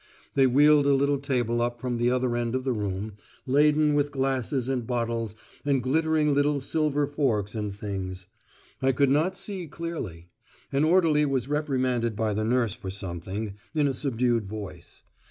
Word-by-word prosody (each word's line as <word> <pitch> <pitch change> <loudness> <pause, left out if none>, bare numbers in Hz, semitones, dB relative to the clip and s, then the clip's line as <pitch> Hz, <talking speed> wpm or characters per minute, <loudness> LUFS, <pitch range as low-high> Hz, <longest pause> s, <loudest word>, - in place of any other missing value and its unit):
They 135 -1 +5
wheeled 145 +2 +5
a 140 - +5
little 140 +1 +2
table 120 -4 0
up 120 0 -1
from 125 0 -2
the 120 +1 +2
other 125 -1 +1
end 120 0 -1
of 130 - -1
the 130 -1 0
room, 100 -1 -4 0.3
laden 150 +2 +4
with 145 0 +2
glasses 135 -2 -1
and 125 -4 -2
bottles 115 -3 -2 0.3
and 140 -3 +1
glittering 155 +2 +2
little 145 0 +2
silver 145 +1 0
forks 125 -9 -1
and 105 -2 -3
things. 95 -2 -5 0.6
I 135 0 +3
could 140 +1 +3
not 165 +6 +2
see 195 -3 -5
clearly. 145 - -6 0.4
An 140 +2 +2
orderly 155 -3 +4
was 135 -3 -1
reprimanded 130 -6 0
by 110 0 0
the 110 +1 -1
nurse 115 -2 +1
for 95 - -7
something, 95 +2 -5 0.2
in 150 -2 +3
a 135 - 0
subdued 120 -5 0
voice. 105 -1 -9
130 Hz, 170 wpm, -26 LUFS, 110-145 Hz, 0.6 s, They